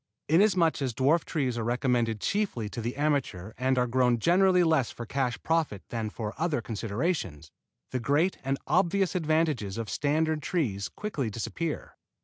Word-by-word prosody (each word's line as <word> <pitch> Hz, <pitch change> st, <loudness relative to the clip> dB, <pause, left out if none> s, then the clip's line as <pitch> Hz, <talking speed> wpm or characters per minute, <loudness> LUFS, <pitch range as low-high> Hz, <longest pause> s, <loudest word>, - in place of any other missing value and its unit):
Inasmuch 170 Hz, -2 st, +3 dB
as 130 Hz, -4 st, -2 dB
dwarf 145 Hz, +6 st, +3 dB
trees 130 Hz, -7 st, -1 dB
are -, -, -2 dB
recommended 120 Hz, -2 st, 0 dB
chiefly 200 Hz, -, -1 dB
to 115 Hz, -, -5 dB
the 120 Hz, +2 st, -3 dB
amateur 135 Hz, -10 st, -1 dB
and 130 Hz, +1 st, +1 dB
are 125 Hz, -, +3 dB
grown 125 Hz, 0 st, +2 dB
generally 180 Hz, -, +4 dB
less 160 Hz, -7 st, +2 dB
for 120 Hz, -, -7 dB
cash 125 Hz, 0 st, -1 dB
profit 160 Hz, -, 0 dB
than 115 Hz, -2 st, -3 dB
for 105 Hz, 0 st, -5 dB
other 160 Hz, -4 st, +1 dB
considerations, 105 Hz, -, -3 dB, 0.4 s
the 130 Hz, -, -1 dB
great 145 Hz, +9 st, +1 dB
and 135 Hz, +1 st, 0 dB
obvious 190 Hz, 0 st, +2 dB
advantages 155 Hz, -, 0 dB
of 115 Hz, -4 st, -4 dB
standard 155 Hz, -, +1 dB
trees 105 Hz, -, -1 dB
quickly 155 Hz, -, -3 dB
disappear. 150 Hz, +9 st, -4 dB
135 Hz, 155 wpm, -28 LUFS, 115-165 Hz, 0.4 s, generally